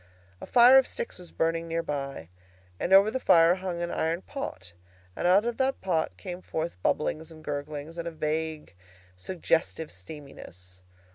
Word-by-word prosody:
A - - -8
fire 250 +2 +8
of 265 - 0
sticks 485 - -5
was 180 -2 -12
burning 165 0 -1
near 165 0 -1
by, 140 - -5 0.5
and - - -2
over 195 +3 +7
the 260 - -2
fire 165 -6 +6
hung 180 -2 -4
an 170 - -3
iron 165 +3 -1
pot, 95 - -7 0.4
and - - 0
out 195 +5 +5
of 240 -1 -2
that 265 0 +1
pot 170 -4 -1
came 180 -2 -7
forth 160 - -4
bubblings 155 - -1
and 160 -1 -14
gurglings, 150 +2 -5
and 170 - -4
a - - -3
vague 155 - -3 0.4
suggestive 160 - -1
steaminess. 90 - -11
165 Hz, 165 wpm, -28 LUFS, 150-185 Hz, 0.5 s, fire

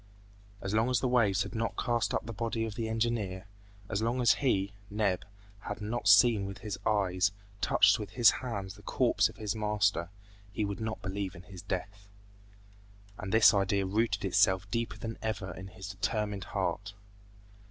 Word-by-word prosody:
As 95 +1 -3
long 110 +3 +2
as 125 - +2
the 130 - 0
waves 115 -6 +3
had - - -8
not 115 0 -2
cast 120 -2 0
up - - -1
the 115 - -6
body 115 +1 -2
of 110 - -5
the 115 0 -3
engineer, 110 -5 -1 0.4
as 100 +1 -2
long 120 +3 0
as 120 -3 +5
he, 100 -7 +1 0.2
Neb, 100 -3 0 0.4
had 105 +1 -6
not 110 +1 -3
seen 105 0 +6
with 100 - -7
his 105 - -4
eyes, 100 -1 +2 0.3
touched 100 +2 +4
with 105 - -5
his 120 -2 +6
hands 100 -7 -4
the 105 - -15
corpse - - +2
of - - -13
his 105 0 -3
master, 105 -5 +1 0.4
he 105 +1 -1
would 100 +1 -4
not 110 -1 -4
believe 95 0 -3
in 85 - -11
his 90 -1 -11
death! 100 +2 -5 1.1
And 95 - -5
this 110 0 +7
idea 100 0 +1
rooted 100 0 0
itself 95 0 +3
deeper 115 -4 -2
than 115 +2 -6
ever 100 -5 -3
in 90 +3 -8
his 95 0 -9
determined 100 0 -2
heart. 100 0 -3
105 Hz, 180 wpm, -30 LUFS, 95-115 Hz, 1.1 s, this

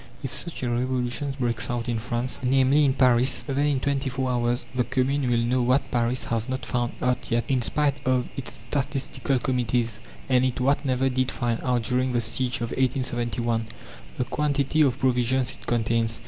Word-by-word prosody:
If 135 -2 -3
such 170 -5 -4
a 125 - 0
revolution 125 +2 -1
breaks 115 -2 0
out 120 0 -2
in 115 -2 -1
France, 120 +2 -3
namely 135 +3 +4
in 135 -1 +2
Paris, 125 -1 +3
then 135 -1 -2
in 140 -3 +1
twenty 140 0 -1
four 130 0 -1
hours 120 0 0
the 125 -1 +1
Commune 130 +1 0
will 120 - +2
know 120 +2 +1
what 130 +3 +1
Paris 120 0 +1
has 115 +1 -2
not 130 0 -3
found 120 -1 -1
out 125 0 0
yet, 120 -1 +1
in 130 -2 +1
spite 145 +3 +1
of 130 -2 +1
its 135 - -5 0.2
statistical 135 -1 -1
committees, 120 -3 0 0.3
and 130 0 +2
what 135 +3 +2
it - - -15
never 130 0 +1
did 130 0 0
find 120 -2 -1
out 125 -3 0
during 125 +2 0
the 120 - +2
siege 120 +2 0
of 115 - -3
1871 120 -3 0 0.5
the - - +1
quantity 145 +2 0
of 135 -4 +3
provisions 130 0 +1
it - - -10
contains. 115 -1 +1
125 Hz, 190 wpm, -25 LUFS, 120-130 Hz, 0.5 s, namely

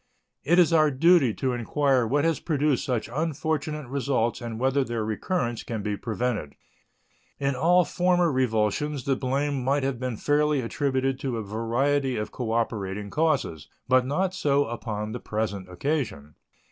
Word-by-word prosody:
It 170 +5 +3
is 175 -2 +5
our 155 -2 +5
duty 145 -1 +4
to 130 -2 -1
inquire 130 +1 +1
what 145 +5 +1
has 165 -2 +1
produced 150 -4 +1
such 125 -6 -1
unfortunate 155 -1 -2
results 130 -3 -1
and 115 -2 -5
whether 135 +2 +2
their 115 -3 -3
recurrence 120 - -2
can 110 -3 -5
be 105 0 -1
prevented. 110 -7 -3 0.8
In 140 0 0
all 175 +6 +4
former 180 -2 +2
revulsions 130 +3 0
the 135 +1 +1
blame 135 +1 -1
might 140 +2 +1
have 135 -3 -1
been 125 -3 -3
fairly 150 +2 +2
attributed 130 +1 -1
to 130 -4 -2
a 110 - -3
variety 125 +6 0
of 105 0 -3
cooperating 105 -4 -2
causes, 145 - 0 0.2
but 130 0 +4
not 175 +8 0
so 145 -5 +2
upon 110 -2 -4
the 120 - -5
present 100 -4 -3
occasion. 90 - -3
130 Hz, 155 wpm, -26 LUFS, 115-145 Hz, 0.8 s, is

